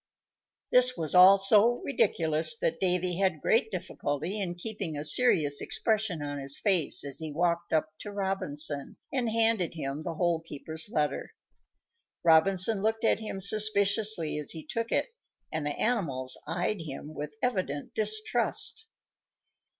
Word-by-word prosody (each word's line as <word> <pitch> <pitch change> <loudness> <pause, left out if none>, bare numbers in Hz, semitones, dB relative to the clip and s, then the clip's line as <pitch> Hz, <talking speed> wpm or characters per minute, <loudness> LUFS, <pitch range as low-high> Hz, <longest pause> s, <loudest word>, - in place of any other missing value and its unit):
This 250 0 +6
was 160 -3 -2
all 185 +2 +7
so 210 +4 +4
ridiculous 160 - +1
that 165 +1 -2
Davy 180 -1 -1
had 185 -5 0
great 225 +6 +1
difficulty 170 -1 -4
in 175 -3 -4
keeping 185 -4 -5
a 145 - -4
serious 150 - +2
expression 215 -8 -2
on 145 0 -5
his 135 0 +1
face 185 -8 +1
as 140 -1 -4
he 160 -1 -5
walked 170 +2 -2
up 155 0 0
to 205 - -8
Robinson 160 -8 0 0.2
and 250 -4 -1
handed 225 -6 0
him 140 -1 -5
the 165 0 -5
Hole 170 0 0
keeper's 160 +2 -2
letter. 150 -6 -3 0.9
Robinson 185 +5 +4
looked 220 +2 -1
at 225 - +2
him 215 -3 -6
suspiciously 200 -4 +2
as 150 - -1
he 160 -2 -9
took 230 +8 -4
it, - - -1 0.4
and 155 -2 -3
the 145 - -4
animals 145 - 0
eyed 180 +3 -2
him 150 0 -8
with 150 0 -7
evident 185 - -3
distrust. 215 - 0
175 Hz, 145 wpm, -28 LUFS, 155-215 Hz, 0.9 s, all